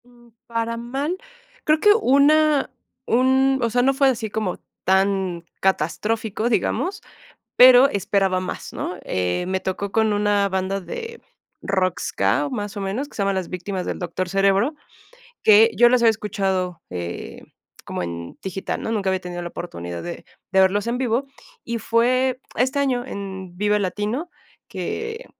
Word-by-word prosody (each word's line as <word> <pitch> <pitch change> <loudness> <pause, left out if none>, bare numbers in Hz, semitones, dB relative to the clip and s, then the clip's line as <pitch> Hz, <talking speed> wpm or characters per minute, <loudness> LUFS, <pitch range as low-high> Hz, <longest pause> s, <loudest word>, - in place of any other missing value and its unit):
Mm, 240 -1 -21 0.2
para 230 0 -2
mal. 270 +9 -3 0.5
Creo 305 0 +3
que 420 - +6
una 305 - +4 0.4
un, 265 +2 +3
o 235 - +1
sea, 245 +2 +2
no 270 +2 +3
fue 275 0 +3
así 225 -4 -2
como 205 -3 -3 0.3
tan 190 -2 +1 0.2
catastrófico, 210 +5 0
digamos, 340 - 0 0.6
pero 255 +1 +9
esperaba 195 -3 +1
más, 185 - -6
¿no? - - -4
Eh, 90 - -1
me 190 0 -1
tocó 195 +2 -3
con 220 -1 +2
una 205 -1 +2
banda 190 +1 -1
de 460 - -7 0.4
rock 185 -2 0
ska, 100 +9 0
más 205 0 -4
o - - -3
menos, 215 +9 -3
que - - -19
se 205 - 0
llama 195 0 +1
las 190 -2 -2
Víctimas 185 +1 -4
del - - -3
Doctor 180 0 -3
Cerebro, 195 - +2 0.7
que 220 +2 +7
yo 240 +1 +6
los 250 0 +3
había 230 - +7
escuchado, 190 -5 -2
eh, 85 -1 -6 0.4
como - - -4
en 85 -1 -6
digital, 190 0 -4
¿no? - - -2
Nunca 200 -4 0
había 190 0 0
tenido 175 -1 -6
la 175 - -4
oportunidad 85 - -6
de 175 - -7 0.3
de 190 - +4
verlos 195 +2 +2
en 235 +1 0
vivo, 250 +1 0 0.4
y 235 0 -3
fue 255 +3 +2 0.2
este 260 +3 +1
año 260 -3 +1
en 190 -5 -7
Vive 210 +1 +2
Latino 210 - -2 0.4
que 450 +2 -5
205 Hz, 160 wpm, -22 LUFS, 190-250 Hz, 0.7 s, pero